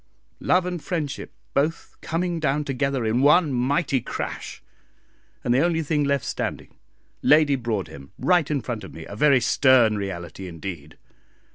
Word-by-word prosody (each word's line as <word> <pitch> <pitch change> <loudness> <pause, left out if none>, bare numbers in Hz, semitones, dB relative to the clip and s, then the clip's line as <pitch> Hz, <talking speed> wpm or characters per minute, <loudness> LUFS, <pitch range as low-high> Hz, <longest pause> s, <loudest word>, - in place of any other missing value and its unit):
Love 180 0 +2
and 180 -3 -4
friendship 160 -6 -4 0.2
both 150 +4 -1
coming 170 +1 -2
down 150 -1 0
together 135 -3 -1
in 115 +3 +1
one 150 +1 +5
mighty 135 +2 +1
crash, - - -6 0.8
and 120 - +2
the 125 - +3
only 165 -1 +1
thing 150 0 0
left 140 -3 0
standing - - -5 0.4
Lady 150 -1 +5
Broadhem 95 - -4
right 175 -5 +2
in 145 -3 0
front 115 -4 -5
of 95 - -10
me 80 - -8
a 100 - -9
very 140 +3 +4
stern 125 -2 +4
reality 95 -2 -6
indeed. 85 -3 -8
135 Hz, 150 wpm, -24 LUFS, 110-155 Hz, 0.8 s, one